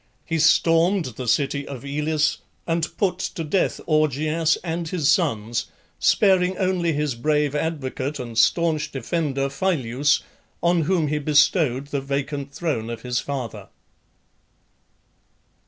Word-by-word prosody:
He 165 0 -1
stormed 165 +3 +4
the 125 0 -6
city 140 +3 0
of 135 -1 -8
Elis 150 +2 0 0.3
and 165 0 0
put 185 -3 0
to 165 - -4
death 160 +5 0
Augeas 155 +1 +2
and 165 -1 -3
his 155 -4 +1
sons, 115 - 0 0.3
sparing 185 -2 +3
only 185 -3 +1
his 150 -2 -1
brave 150 +4 0
advocate 145 -2 -3
and 120 -3 -7
staunch 155 +7 +2
defender 140 +1 -1
Phyleus, 140 -3 0 0.4
on 170 0 +3
whom 170 -3 +1
he 150 0 0
bestowed 145 -2 +2
the 140 -2 -2
vacant 140 +1 -3
throne 135 -7 -2
of 115 -1 -6
his 125 -1 -1
father. 130 -6 -5
150 Hz, 125 wpm, -23 LUFS, 135-165 Hz, 0.4 s, stormed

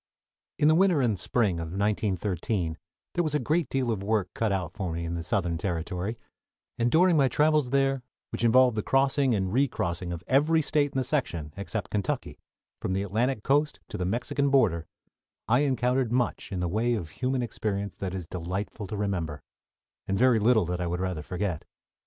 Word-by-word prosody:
In 150 - +3
the 155 - +6
winter 180 -2 +4
and 115 -7 +1
spring 100 -3 +1
of 85 - -3
1913 95 -2 -1 0.4
there 175 - +1
was 155 -2 -1
a - - +3
great 155 +3 0
deal 130 -3 0
of 105 -4 -2
work 100 -2 0
cut 110 -2 0
out 90 -3 -2
for 95 -6 -3
me 85 +1 -3
in 85 - -3
the 85 - -2
Southern 85 -1 -1
territory, 90 +4 -3 0.6
and 120 +1 +3
during 175 +5 +5
my 140 -3 +4
travels 150 -1 +2
there, 135 0 +2 0.3
which - - -3
involved 125 +1 +5
the 105 - 0
crossing 135 0 +2
and 95 -1 -1
recrossing 90 -10 0
of 85 0 -5
every 155 +4 +3
State 145 -1 +1
in - - -2
the 130 - +2
section 85 - -2
except 100 0 -4
Kentucky, 100 -3 -2 0.4
from 95 - -1
the 95 +1 0
Atlantic 110 +4 0
coast 145 +2 +2
to - - -5
the - - 0
Mexican 125 +7 0
border, 100 - +3 0.6
I 125 +3 +4
encountered 130 -3 +1
much 125 -1 -1
in 95 -2 -2
the 90 - 0
way 115 +7 +1
of 85 -8 -4
human 130 - -1
experience 100 -3 -3
that 95 -1 -4
is 90 -3 -5
delightful 95 +5 -4
to 105 - -5
remember, 85 -8 -2 0.6
and 95 - 0
very 125 -1 +4
little 110 -2 +4
that 90 +1 -3
I 90 - -1
would 90 +1 -2
rather 90 -4 -2
forget. 90 0 -3
110 Hz, 195 wpm, -27 LUFS, 90-130 Hz, 0.6 s, the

